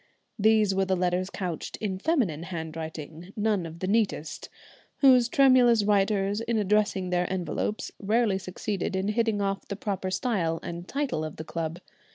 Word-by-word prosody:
These 215 -1 +4
were 195 0 +1
the 190 0 +1
letters 180 +1 0
couched 180 -5 -4
in 190 -3 -3
feminine 215 - +1
handwriting, 160 0 -7
none 210 -5 0
of 165 0 -10
the 185 - -1
neatest, 200 -7 -1 0.5
whose 255 -4 +6
tremulous 250 -5 +5
writers, 200 0 +2
in 230 0 -1
addressing 205 -3 +1
their 180 0 0
envelopes, 190 +3 -2
rarely 210 -1 +1
succeeded 190 +1 -3
in 190 +2 0
hitting 220 -1 +1
off 195 0 -2
the 200 - -4
proper 195 -2 -3
style 180 -5 0
and 170 +1 -6
title 275 - -2
of 155 -1 -5
the 160 - -6
club. 165 0 -4
195 Hz, 160 wpm, -27 LUFS, 175-215 Hz, 0.5 s, whose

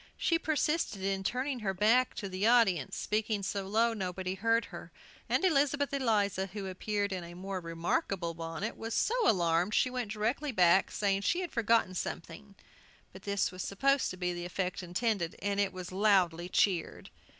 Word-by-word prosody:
She 330 -1 +1
persisted 305 - -1
in 195 0 -1
turning 255 +5 -2
her 195 -3 -2
back 230 +6 +3
to 200 - -4
the 190 +3 0
audience, 210 - +3
speaking 215 -1 -1
so 195 0 -3
low 225 +3 +2
nobody 185 -2 -3
heard 230 +4 +1
her; - - -9 0.4
and - - +2
Elizabeth 285 -4 +2
Eliza, 205 -7 +1
who 195 +1 -6
appeared 200 +2 -2
in 185 -2 -4
a 170 0 -10
more 190 +1 -4
remarkable 170 +1 -2
bonnet, 165 +6 -5
was 225 0 -5
so 450 - +1 0.2
alarmed 175 +1 +2
she 255 - +2
went 245 -4 -3
directly 235 +7 -1
back, 185 -3 +4
saying 195 -1 0
she 350 - +1
had 355 - -5
forgotten 230 -4 +2
something 200 +3 -6 0.6
But - - -11
this 200 -2 0
was 185 0 -7
supposed 275 +9 +1
to 185 - -7
be 180 -1 -1
the 175 0 -5
effect 180 +1 -3
intended, 180 -1 -1
and 200 +1 -1
it 200 -1 +1
was 185 -1 -7
loudly 185 -4 +2
cheered. 185 -3 0
200 Hz, 175 wpm, -31 LUFS, 185-230 Hz, 0.6 s, back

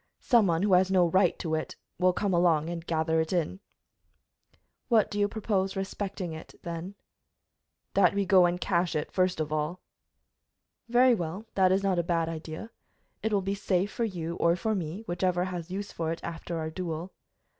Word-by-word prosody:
Some 235 -5 +4
one 165 +1 +1
who 205 -2 +3
has 185 +1 +5
no 185 -2 +4
right 185 +1 +3
to 160 -2 -3
it 155 - -2 0.2
will 185 0 +4
come 195 +1 -1
along 170 -2 +3
and 170 -1 -5
gather 160 -1 +1
it 160 - -3
in." 180 +1 -1 1.3
"What 225 -4 +3
do 205 - -2
you 205 - +3
propose 200 -3 -1
respecting 195 -2 -4
it, 160 - -10
then?" 170 +2 -5 1.0
"That 195 -1 +4
we 200 -1 +1
go 185 -2 +6
and 175 +1 -2
cache 175 -2 0
it 150 - -2
first 185 -2 +1
of 155 -1 -2
all." 155 +4 -2 1.1
"Very 245 +1 +5
well, 180 +1 -3
that 185 -1 +4
is 195 +1 +2
not 190 -3 +2
a - - +4
bad 165 -1 0
idea. 160 +6 -7 0.5
It 220 - -1
will 200 -2 +1
be 195 +1 -1
safe 195 -1 0
for 235 - -2
you 170 -6 -3
or 170 0 +3
for 220 +5 -1
me, 180 0 -3
whichever 180 0 0
has 180 -2 -5
use 200 +2 -4
for 165 -1 -2
it 165 - -4
after 170 0 -5
our 160 0 -3
duel." 170 +1 -5
180 Hz, 190 wpm, -28 LUFS, 165-195 Hz, 1.3 s, go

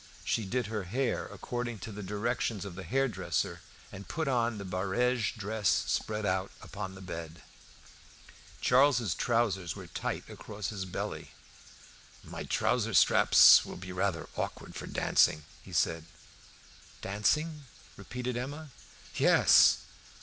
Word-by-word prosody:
She 110 - 0
did 120 +5 -1
her 105 -2 -4
hair 120 +6 -1
according 120 -2 -5
to 115 - -7
the 105 0 -7
directions 105 0 -2
of 100 - -7
the 95 - -8
hairdresser, 135 +7 -1 0.3
and 100 0 -10
put 160 -1 -3
on 120 -4 +1
the 100 - -6
barege 105 +7 0
dress 105 -2 -1
spread 110 -1 0
out 95 0 0
upon 95 -2 -7
the 95 - -11
bed. 85 -1 -7 1.2
Charles's 125 - +4
trousers 105 -8 0
were - - -9
tight - - -4
across 105 -2 -6
the 95 -3 -5
belly. 90 - -5 0.9
"My - - -7
trouser - - 0
straps - - +7
will - - -8
be 90 0 -8
rather 90 -2 -1
awkward - - -4
for - - -7
dancing," 75 0 +2 0.2
he - - -14
said. 80 -1 0 1.0
"Dancing?" 150 +10 0 0.3
repeated 125 0 -5
Emma. 145 +4 -5 0.5
"Yes!" - - +6
105 Hz, 130 wpm, -30 LUFS, 95-125 Hz, 1.2 s, straps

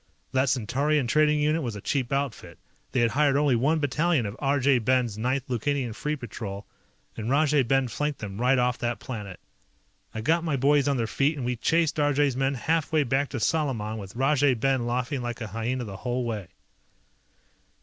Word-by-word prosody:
That 130 0 +2
Centaurian 135 +4 +1
trading 150 +4 +3
unit 155 +2 +1
was 120 -6 -4
a - - -6
cheap 130 +3 -2
outfit, 130 - -3 0.3
they 125 - +1
had 115 -1 +2
hired 140 0 +3
only 145 -3 +3
one 140 +7 +2
battalion 150 -1 +1
of 100 +1 -5
Arjay 140 -2 +3
Ben's 125 -2 +1
Ninth 125 +4 -1
Lukanian 130 0 -1
Free 150 +7 -2
Patrol, 105 -6 -7 0.5
and 110 +1 -4
Rajay 145 +1 +3
Ben 135 +1 +1
flanked 150 +4 -2
them 100 0 -6
right 130 +2 +4
off 125 0 +1
that 120 0 -1
planet. 105 -7 -7 0.7
I 110 - -5
got 165 +8 +2
my 155 -4 0
boys 140 +1 +3
on 140 -2 +1
their 115 - 0
feet 140 +7 0
and 130 - -4
we 125 0 -1
chased 160 +5 +1
Arjay's 145 -2 +2
men 135 +1 0
half 160 +4 0
way 155 -2 +3
back 135 +2 0
to 130 - -4
Salaman 115 -7 -1
with 100 0 -9
Rajay 135 +1 +3
Ben 130 0 0
laughing 125 +3 -1
like 120 -1 -4
a 115 - -4
hyena 115 +4 -3
the 100 -4 -7
whole 125 +3 -2
way. 105 -6 -4
130 Hz, 190 wpm, -26 LUFS, 120-145 Hz, 0.7 s, right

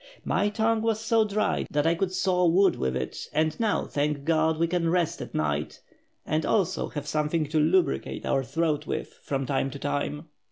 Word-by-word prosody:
My 205 - +1
tongue 220 +1 +1
was 225 -1 0
so 225 0 +2
dry 215 +1 0
that 145 0 0
I 165 - +4
could 185 +2 -1
saw 180 -1 +2
wood 190 +4 +4
with 65 0 -1
it, 65 0 -5
and 155 +1 +1
now 220 -3 +1
thank 145 -1 -1
God, 160 0 +2
we 165 - +2
can 170 0 0
rest 170 -2 0
at 120 -1 -7
night, 75 -1 -1 0.5
and 155 +1 0
also 190 -4 +1
have 145 -2 -5
something 150 +1 0
to 155 0 +1
lubricate 160 - +1
our 135 - +1
throat 155 +1 -1
with - - -4
from 135 -1 -2
time 135 +1 0
to 140 - -7
time." 145 +2 -3
160 Hz, 195 wpm, -27 LUFS, 145-185 Hz, 0.5 s, I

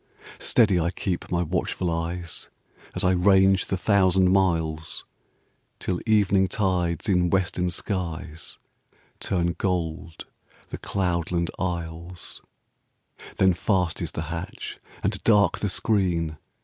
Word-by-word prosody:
Steady 100 -6 +4
I 85 +1 +1
keep 90 0 -3
my 85 0 +1
watchful 90 +1 -1
eyes, 85 0 -4 0.5
As - - -2
I 90 - +4
range 95 +1 +4
the 95 - -1
thousand 95 -2 +3
miles. 80 -5 0 0.7
Till 90 -1 -2
evening 100 -3 +4
tides 90 -4 0
in 90 -3 +3
western 90 -1 +1
skies 85 -4 -4 0.6
Turn 85 -2 0
gold 85 -2 -2 0.4
the - - -6
cloudland 85 -2 -1
isles; 85 0 -5 1.0
Then 95 -1 +5
fast 90 -1 0
is - - -3
the 80 - -3
hatch 85 +2 -6 0.2
and - - -1
dark 100 -5 +4
the 105 - -1
screen. 90 -7 0
90 Hz, 115 wpm, -25 LUFS, 85-95 Hz, 1.0 s, Then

